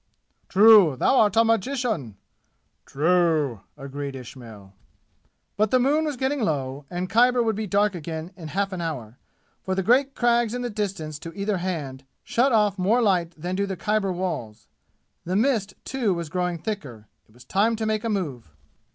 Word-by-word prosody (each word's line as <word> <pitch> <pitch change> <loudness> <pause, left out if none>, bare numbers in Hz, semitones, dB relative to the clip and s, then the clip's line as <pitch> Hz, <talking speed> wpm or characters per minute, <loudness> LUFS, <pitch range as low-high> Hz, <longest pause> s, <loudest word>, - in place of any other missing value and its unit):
"True! 200 -6 +7
Thou 200 - +2
art 205 -1 +3
a 225 - +6
magician!" 225 - -1 0.7
"True!" 155 - +1 0.2
agreed 140 0 -6
Ismail. 115 -6 -11 0.8
But 215 +1 +2
the 255 - +4
moon 290 +5 +2
was 295 -4 -3
getting 265 +2 -1
low 140 -6 -2
and 180 +1 -3
Khyber 245 +3 +3
would 220 -2 0
be 215 +1 -3
dark 205 +1 +2
again 160 0 -6
in 165 -4 -9
half 195 +5 -2
an 180 - -4
hour, 130 -9 -5 0.4
for 190 - -2
the 190 - -1
great 265 +6 +3
crags 240 -1 +2
in 245 - -3
the 245 - -3
distance 190 -8 -4
to 165 - -8
either 200 0 -1
hand 155 -8 -4 0.2
shut 260 +4 +1
off 210 -3 +2
more 205 +7 +3
light 175 -5 +1
than 180 +3 -3
do 200 +1 -1
the 190 -1 -4
Khyber 210 -1 0
walls. 115 - -4 0.6
The 180 +2 -3
mist, 220 -2 +1
too, 235 -8 0
was 170 -2 -5
growing 180 0 -1
thicker. 145 - -6 0.2
It 110 - -26
was 125 0 -16
time 215 +9 +1
to 220 0 -3
make 215 0 -1
a 230 - -1
move. 145 - -3
190 Hz, 175 wpm, -24 LUFS, 150-220 Hz, 0.8 s, True